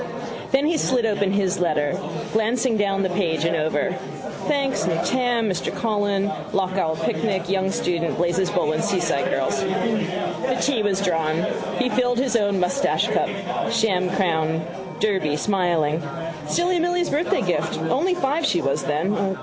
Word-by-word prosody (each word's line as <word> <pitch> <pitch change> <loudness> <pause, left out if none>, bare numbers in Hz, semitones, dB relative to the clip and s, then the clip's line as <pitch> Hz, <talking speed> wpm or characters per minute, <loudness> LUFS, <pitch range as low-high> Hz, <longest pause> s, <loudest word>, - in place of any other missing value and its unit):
Then 275 +2 +3
he 325 +1 +2
slit 255 -5 +1
open 200 -3 +1
his 195 -3 +1
letter, 150 -4 +1 0.4
glancing 225 +2 +1
down 195 -1 +1
the 190 - +1
page 165 -4 0
and 165 0 +2
over. 155 0 0 0.5
Thanks: 275 - +1
new 165 -1 +1
tam: 245 -3 +1
Mr 185 -3 -1
Coghlan: 205 -3 0 0.3
lough 190 -1 +1
Owel 165 -4 0
picnic: 190 -5 -1
young 190 0 +1
student: 170 -3 -1
Blazes 175 +2 +1
Boylan's 155 +2 0
seaside 180 -3 +1
girls. - - 0
The - - -1
tea 265 -6 +1
was 200 -2 +1
drawn. 165 -3 +1 0.3
He 250 0 +1
filled 245 -1 +1
his 255 -1 +1
own 205 -3 +2
moustachecup, 185 +10 0
sham 195 -6 +2
crown 160 -4 0 0.3
Derby, 190 -8 +1
smiling. 170 -5 +1 0.5
Silly 350 - +1
Milly's 350 0 +1
birthday 300 +5 +1
gift. - - 0
Only 365 0 +1
five 305 0 0
she 180 - +2
was 140 -2 0
then. 190 +5 0
195 Hz, 150 wpm, -23 LUFS, 170-240 Hz, 0.5 s, Then